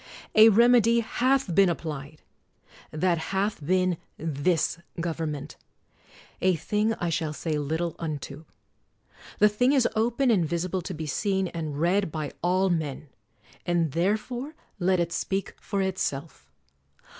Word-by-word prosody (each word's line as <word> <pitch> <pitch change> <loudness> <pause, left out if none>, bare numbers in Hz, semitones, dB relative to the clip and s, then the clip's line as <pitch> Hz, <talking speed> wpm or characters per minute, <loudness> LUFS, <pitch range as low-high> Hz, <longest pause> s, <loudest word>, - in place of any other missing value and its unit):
A 220 +1 +8
remedy 235 +1 +5
hath 255 -2 +1
been 195 +2 +5
applied: 155 -3 -5 0.7
that 170 +2 0
hath 195 0 -2
been 185 +2 +1 0.2
this 160 +2 0 0.2
government; 160 -4 -4 0.8
a 185 -1 +3
thing 210 +6 0
I 175 -4 -2
shall 160 -2 -1
say 155 0 -2
little 160 +3 -2
unto. 150 -1 -5 0.9
The 210 - +6
thing 245 +6 +2
is 265 -4 +4
open 235 +4 +2
and 195 -6 +3
visible 170 +3 -2
to 180 +1 -6
be 160 0 -5
seen 190 +5 0
and 155 -4 -5
read 180 +2 +1
by 155 -2 -4
all 185 +2 +2
men; 150 -3 -3 0.5
and 170 -3 +1
therefore 220 - -1 0.2
let 185 0 +2
it 170 0 0
speak 195 +3 -2
for 200 -2 -2
itself. 155 - -3
175 Hz, 135 wpm, -26 LUFS, 160-205 Hz, 0.9 s, A